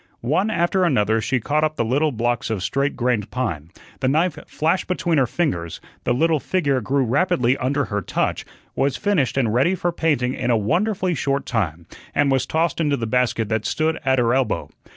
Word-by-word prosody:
One 175 - +1
after 185 -1 +1
another 110 -9 +2
she 130 +3 0
caught 150 +6 0
up 155 0 0
the 115 - 0
little 145 +6 +1
blocks 120 0 -1
of 105 -5 -2
straight 140 +6 0
grained 120 -4 0
pine, 85 - -3 0.3
the 130 - 0
knife 160 +5 +2
flashed 165 +4 0
between 170 -3 +1
her 130 - +2
fingers, 90 - -2 0.3
the - - +1
little 160 +5 +2
figure 140 -3 0
grew 135 +4 +1
rapidly 125 -1 +2
under 140 +2 0
her 105 -1 -2
touch, - - -1 0.3
was 135 -1 0
finished 190 - 0
and 115 -5 +1
ready 140 +10 +3
for 175 -1 -1
painting 145 -7 0
in - - -2
a 120 - +4
wonderfully 185 - 0
short 140 -2 -1
time, 85 -8 -2 0.3
and 145 -1 +3
was 135 -1 +1
tossed 165 +1 0
into 145 -3 +1
the 115 - -3
basket 115 -1 0
that 110 -1 0
stood 160 +1 0
at 130 -1 +2
her 120 -1 +2
elbow. 130 -5 0
135 Hz, 195 wpm, -22 LUFS, 120-160 Hz, 0.3 s, a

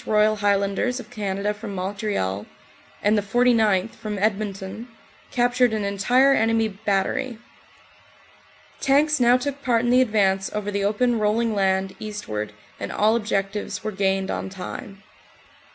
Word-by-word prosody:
Royal 215 0 +3
Highlanders 205 +4 +1
of - - -11
Canada 200 0 -2
from 210 -1 -7
Montreal, 185 - -2 0.6
and 210 +1 +4
the 210 - +2
49th., 220 -2 +2
from 210 -1 -6
Edmonton, 200 +1 -2 0.4
captured 245 -1 +2
an 215 -1 -1
entire 245 +8 +3
enemy 225 -2 +2
bat 195 -1 0
tery. 260 -4 -3 1.4
Tanks 295 +2 +3
now 245 0 +5
took 280 +2 -4
part 235 -3 +1
in 240 - +1
the 250 +1 +6
advance 195 -5 +1
over 205 -1 -3
the 200 0 -1
open 230 +3 +1
roll 210 +1 +2
ing 230 -1 0
land 190 -1 0
eastward 110 - -5 0.3
and 100 - -4
all 215 +2 +3
objectives 205 -3 -2
were 215 - -2
gained 195 -1 0
on - - -3
time. 195 +1 -8
210 Hz, 145 wpm, -23 LUFS, 195-235 Hz, 1.4 s, the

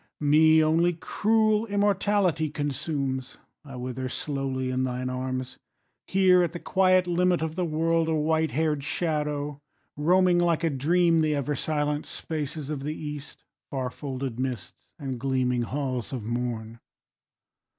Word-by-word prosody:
Me 155 +2 +5
only 165 +3 +3
cruel 215 +5 +1
immortality 200 -5 +1
Consumes: 140 -3 -3 0.3
I 135 -3 -10
wither 130 +1 -4
slowly 135 -2 -2
in 130 0 0
thine 125 0 -2
arms, 130 0 -4 0.5
Here 185 -1 +5
at 175 -1 0
the 175 - -5
quiet 185 0 +3
limit 180 -1 +2
of 160 -1 -2
the 180 +1 -1
world, 165 +1 +1
A 160 - +1
white 160 +1 +1
hair'd 150 +1 0
shadow 150 -2 -2 0.4
roaming 180 +4 +3
like 170 -1 +2
a 165 - +2
dream 165 +5 +3
The 155 -1 +2
ever 145 +1 -1
silent 150 +1 -1
spaces 150 -1 -5
of 145 -3 -3
the 150 +2 -3
East, 150 -2 -8 0.3
Far 130 -2 -3
folded 130 -4 -5
mists, 125 -8 -5
and 130 -3 -5
gleaming 130 -1 0
halls 130 0 -3
of 125 -5 -4
morn. 115 -1 -3
150 Hz, 140 wpm, -26 LUFS, 130-165 Hz, 0.5 s, Me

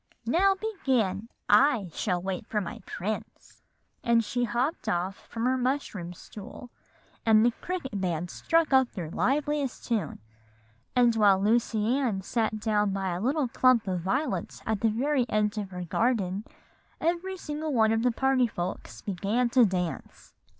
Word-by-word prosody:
'Now 380 +11 +3
begin; 255 - -1 0.2
I 245 - +4
shall 180 -4 -1
wait 185 0 -4
for 210 - 0
my 190 - -5
prince;' 210 +4 -6 0.4
and 235 -2 +3
she 245 +3 0
hopped 245 +8 -1
off 180 +3 -2
from 230 0 -3
her 260 +1 +2
mushroom 245 -9 -2
stool, 215 +6 -11 0.5
and 220 0 +5
the 240 - +4
cricket 265 - -4
band 175 -1 -2
struck 330 -3 +1
up 265 -2 +5
their 170 -5 -5
liveliest 285 - 0
tune; 230 -4 -1 0.8
and 240 -2 +4
while 205 -3 +5
Lucy 225 +3 +2
Ann 215 -8 -1
sat 220 +1 -1
down 210 -2 +1
by 195 -1 -1
a 175 +1 -3
little 270 +4 +1
clump 245 -2 +3
of 180 -2 -1
violets 255 - -2
at 220 -2 -1
the 225 - +3
very 255 +3 +1
end 210 0 +1
of 200 -2 -5
her 180 -1 -6
garden, 205 0 0 0.5
every 350 +3 -1
single 305 -2 -4
one 220 -4 +3
of 225 0 +2
the 250 - +3
party 265 0 +2
folks 180 -3 -5
began 210 +5 0
to 250 -2 +6
dance. 180 -3 -4
225 Hz, 155 wpm, -28 LUFS, 195-260 Hz, 0.8 s, to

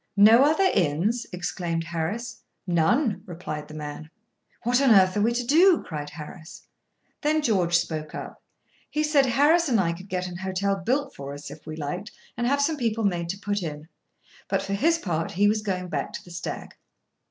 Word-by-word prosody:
"No 220 +5 +8
other 315 +6 +3
inns!" 185 +8 +1
exclaimed 170 -1 -3
Harris. 175 +9 -4 0.2
"None," 190 - +2
replied 160 -4 -6
the 155 - -10
man. 150 +1 -7 0.5
"What 245 +3 +2
on 275 - +4
earth 190 -4 +6
are 205 - +1
we 225 +3 +3
to 240 0 -2
do?" 335 +7 +5
cried 150 -3 -5
Harris. 160 +3 -10 0.6
Then 310 0 +1
George 180 - +3
spoke 155 -3 -4
up. - - -8 0.5
He 305 - 0
said 295 -3 +3
Harris 295 +6 +4
and 230 -4 +3
I 170 -3 +1
could 185 +4 -11
get 180 0 -2
an 180 -1 -6
hotel 190 +1 -1
built 260 +9 -1
for 140 0 -7
us, 145 0 -9
if 155 - -12
we 155 - -5
liked, 160 +7 -5 0.2
and 240 0 -1
have 280 +2 +2
some 315 +1 0
people 225 -3 -1
made 175 -4 0
to 190 - -2
put 205 0 -2
in. 155 -2 -6 0.6
For - - +2 0.2
his 325 +11 +3
part, 165 - -2
he 205 +3 +3
was 215 +1 +2
going 185 -3 -2
back - - -3
to - - -6
the 175 - -13
Stag. 170 -1 -6
190 Hz, 190 wpm, -25 LUFS, 170-240 Hz, 0.6 s, No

